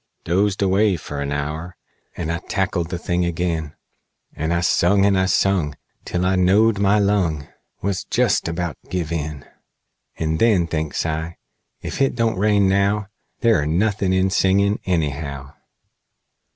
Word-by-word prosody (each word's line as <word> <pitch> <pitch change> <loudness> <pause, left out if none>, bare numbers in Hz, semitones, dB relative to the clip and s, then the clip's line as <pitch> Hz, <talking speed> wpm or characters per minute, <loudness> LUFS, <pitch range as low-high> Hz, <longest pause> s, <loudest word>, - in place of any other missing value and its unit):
"Dozed 100 +3 +1
away 100 +1 +3
fer 75 -3 -6
an 70 0 -3
hour, 75 +5 -4 0.4
And 85 -2 -2
I 85 - -2
tackled 95 -4 -1
the 90 - -3
thing 90 +1 -1
agin; 85 -3 -2 0.6
And 80 +2 -2
I 85 0 +1
sung, 100 +3 +3
and 95 -2 +2
sung, 90 -10 +1 0.3
Till 90 0 -1
I 95 +1 +2
knowed 100 +4 +3
my 100 +1 +3
lung 95 -8 +1 0.4
Was 100 -1 -1
jest - - +1
about 85 -3 -3
give 85 -4 -3
in; 75 -3 -4 0.7
And 80 0 -1
then, 105 -7 +4
thinks 80 -2 -2
I, 80 +1 -3 0.5
ef - - -5
hit 135 -2 +1
don't 115 -5 0
rain 105 -1 +3
now, 100 +1 +1 0.3
There're 110 -11 +3
nothin' 95 +3 +1
in 95 0 +2
singin', 100 +2 +2
anyhow! 70 -5 -2
90 Hz, 145 wpm, -21 LUFS, 80-100 Hz, 0.7 s, then